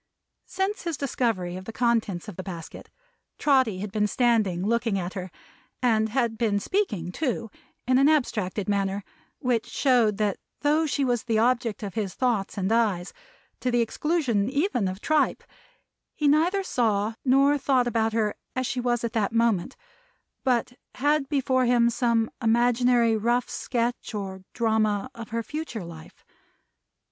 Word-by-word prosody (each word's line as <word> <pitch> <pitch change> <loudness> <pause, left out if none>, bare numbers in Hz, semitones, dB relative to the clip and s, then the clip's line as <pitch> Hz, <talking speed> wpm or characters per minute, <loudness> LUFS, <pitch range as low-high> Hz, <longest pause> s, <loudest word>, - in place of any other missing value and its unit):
Since 390 +2 -2
his 335 -4 -3
discovery 225 -10 -1
of 185 - -9
the 225 - -6
contents 225 -6 0
of 210 - -7
the 185 - -5
basket, 175 -3 -8 0.5
Trotty 260 -10 +2
had 205 -1 -5
been 210 0 +1
standing 210 -6 +1
looking 230 -2 +1
at 180 -1 -4
her 185 -2 -5 0.5
and 220 -3 +2
had 230 -2 0
been 215 -4 +1
speaking 210 - -1
too 230 - -2 0.4
in 255 0 +4
an 275 +2 +5
abstracted 210 -10 0
manner, 200 -1 0 0.3
which 240 -3 0
showed 240 -7 +2
that 210 -2 0 0.2
though 305 +2 +2
she 280 -1 0
was 245 -3 0
the 225 -2 +1
object 235 -2 +1
of 200 - -5
his 205 -4 -3
thoughts 225 -6 0
and 195 +1 -1
eyes, 210 -6 +1 0.5
to 255 - -1
the 240 -1 +2
exclusion 240 -4 0
even 280 - 0
of 185 +2 -5
tripe, 310 -1 +1 0.7
he 300 - +1
neither 340 +7 +3
saw 220 - 0
nor 275 +2 +4
thought 260 -2 +2
about 225 -2 +1
her 215 -2 +1 0.2
as 255 0 -1
she 250 - -2
was 240 -1 0
at 235 -1 -2
that 215 -4 0
moment, 230 -6 +1 0.7
but 245 -1 +1 0.2
had 290 0 +1
before 260 -3 +1
him 240 -1 +4
some 230 -2 +1
imaginary 240 0 +3
rough 235 +3 +1
sketch 240 -2 -2
or 190 -2 -5
drama 220 0 +1
of 230 -2 -9
her 230 0 -2
future 300 - -5
life. 165 -2 -12
230 Hz, 155 wpm, -26 LUFS, 210-255 Hz, 0.7 s, an